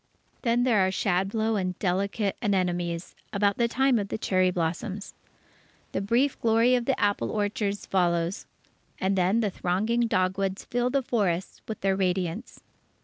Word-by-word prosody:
Then 240 0 +2
there 240 -5 +3
are 185 - +2
shadblow 200 +4 0
and 185 -1 -3
delicate 200 +2 -1
anemones 175 -4 -1 0.2
about 200 0 +1
the 235 - +3
time 260 0 +2
of 200 - -3
the - - -3
cherry 185 -3 +2
blossoms. 180 +4 -3 0.8
The - - -2
brief 240 +7 +1
glory 230 +2 +4
of 245 -1 +1
the 270 - 0
apple 205 0 +1
orchards 205 -1 -1
follows. 175 0 0 0.5
And 190 +1 +1
then 190 +5 +2
the 210 -3 0
thronging 215 +8 0
dogwoods 190 -1 0
fill 245 +1 0
the 275 +1 0
forests 195 -7 -1
with 220 - -6
their 195 0 +2
radiance. 185 +3 -2
200 Hz, 150 wpm, -27 LUFS, 185-230 Hz, 0.8 s, glory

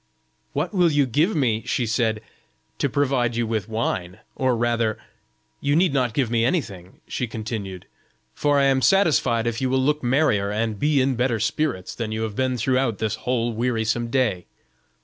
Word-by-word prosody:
"What - - -2
will 175 -4 +3
you 145 -2 +3
give 150 - +1
me," 115 -7 +1
she 125 - 0
said, 110 -1 0 0.6
"to 140 - +1
provide 130 -4 +1
you 120 0 0
with 110 -1 -2
wine?" 95 -5 -2 0.2
or 130 -2 +1
rather, 115 -2 0 0.6
"you 145 +1 +1
need 170 -2 +3
not 125 -5 0
give 130 -5 0
me 115 -1 +2
anything," 100 - -3
she 125 - -3
continued, 110 -5 -5 0.5
"for 145 -1 +1
I 140 - +4
am 135 -1 +3
satisfied 140 - +3
if 120 0 -2
you 130 - +1
will 130 - +2
look 150 +3 +1
merrier 120 -6 +2
and 110 0 -2
be 150 -1 +2
in 130 +1 +2
better 120 -1 0
spirits 115 - -1
than 115 -2 -4
you 110 +1 -2
have 110 -2 -4
been 130 0 0
throughout 125 -1 +1
this 110 +1 -1
whole 120 +1 -1
wearisome 115 0 0
day. 115 -8 0
120 Hz, 180 wpm, -23 LUFS, 110-135 Hz, 0.6 s, I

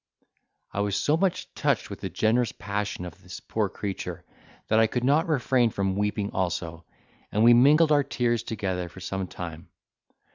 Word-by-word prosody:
I - - -4
was 100 -1 0
so 145 +9 +2
much 185 +2 -1
touched - - 0
with - - -7
the - - -3
generous 115 +2 +1
passion 100 -3 -4
of 90 - -10
this - - -9
poor - - -2
creature, 100 -2 -5 0.4
that 110 - +3
I 110 - +5
could 120 +2 -2
not 150 +6 +3
refrain 130 -5 +2
from 95 -3 -1
weeping 105 0 -1
also, 85 -2 -3 0.5
and 105 - +2
we 120 +1 +8
mingled 150 +6 +6
our 145 -1 +5
tears 120 -3 0
together 95 -6 -3
for 95 - -12
some 95 0 -4
time. 85 0 -8
105 Hz, 175 wpm, -26 LUFS, 95-125 Hz, 0.5 s, we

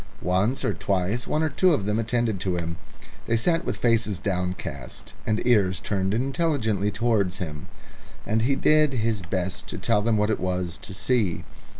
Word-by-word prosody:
Once 95 +8 +1
or - - +1
twice 100 +5 -1
one 155 - +1
or 160 - +1
two 170 +3 +3
of 100 - -3
them 105 +2 0
attended 115 -2 0
to 90 -1 -1
him; 85 -1 -3 0.5
they 115 - +2
sat 165 +8 +1
with - - -3
faces 115 -4 +2
downcast 90 -7 -4
and 110 0 0
ears 100 -7 +3
turned 95 -2 -1
intelligently 120 - 0
towards 100 -3 +1
him, 75 -5 -6 0.6
and 110 +1 +1
he 135 +4 +2
did 155 0 +4
his 115 -3 0
best 95 +3 -3
to - - -5
tell 105 +1 +2
them 110 0 +2
what 105 +1 +2
it 110 - -1
was 90 -1 -2
to 95 - -7
see. 105 -4 0
105 Hz, 180 wpm, -25 LUFS, 95-120 Hz, 0.6 s, did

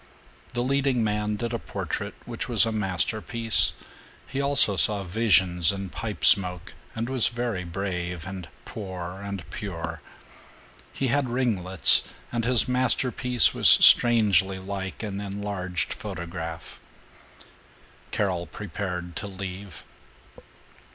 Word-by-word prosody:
The 120 0 -2
leading 135 -2 0
man 105 0 -2
did 115 +2 -5
a 115 - -2
portrait - - -6
which - - -6
was - - +4
a 115 - -2
masterpiece. 105 -1 +1 0.5
He 135 +1 -4
also 140 -7 +2
saw 100 +1 +1
visions 90 -3 +3
in 100 -1 -6
pipe 105 -1 -5
smoke, 90 -3 +3 0.2
and 115 +1 -3
was 130 -3 +1
very 120 -6 -4
brave 90 -1 -5
and 95 -2 -8 0.2
poor 95 -3 -8
and 100 -4 -7
pure. 85 -5 -6 0.9
He 135 - -3
had 140 0 0
ringlets, 100 -8 +2 0.2
and 115 -1 -2
his 125 -1 +4
masterpiece 125 0 +1
was - - +6
strangely 100 -6 +7
like 95 +2 -7
an 100 -2 -5
enlarged 100 -3 -4
photograph. 85 -4 -8 1.3
Carol 90 -4 -2
prepared 90 -3 -6
to - - -6
leave. 95 0 -9
100 Hz, 115 wpm, -25 LUFS, 90-115 Hz, 1.3 s, strangely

